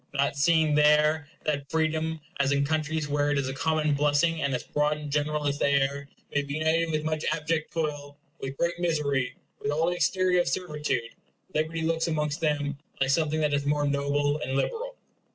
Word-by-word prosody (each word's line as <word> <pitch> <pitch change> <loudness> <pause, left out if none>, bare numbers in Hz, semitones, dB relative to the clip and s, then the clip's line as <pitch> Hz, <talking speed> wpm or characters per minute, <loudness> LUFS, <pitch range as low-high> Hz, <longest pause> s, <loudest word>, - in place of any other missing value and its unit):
Not 140 0 +1
seeing 160 +1 +3
there, 150 0 +4 0.2
that 140 -2 -2
freedom, 160 0 0 0.2
as 140 0 +2
in 140 0 +2
countries 155 0 -1
where 145 0 +1
it 145 - +1
is 135 -2 0
a 135 - -3
common 155 +2 +1
blessing 150 +3 +2
and 140 - 0
as 125 - -3
broad 150 0 0
and 150 -1 -7
general 150 +1 0
as 145 0 0
the - - +2
air, 140 0 +1 0.2
may 145 - +2
be 140 0 -5
united 160 +2 +1
with 155 -1 -1
much 155 0 -1
abject 155 0 -1
toil, 145 -3 -3 0.2
with 135 0 -5
great 170 0 0
misery, 150 -7 0 0.2
with 140 - -3
all 160 +4 +1
the - - -2
exterior 180 +1 +2
of - - -3
servitude; 150 -9 -2 0.4
liberty 160 +1 -1
looks, 165 +1 +1
amongst 150 -2 -1
them, 145 -2 0 0.2
like 135 0 +2
something 155 +1 +1
that 150 -1 +1
is 140 0 0
more 145 0 +2
noble 145 +1 +1
and 130 - -3
liberal. - - -2
150 Hz, 195 wpm, -27 LUFS, 145-160 Hz, 0.4 s, there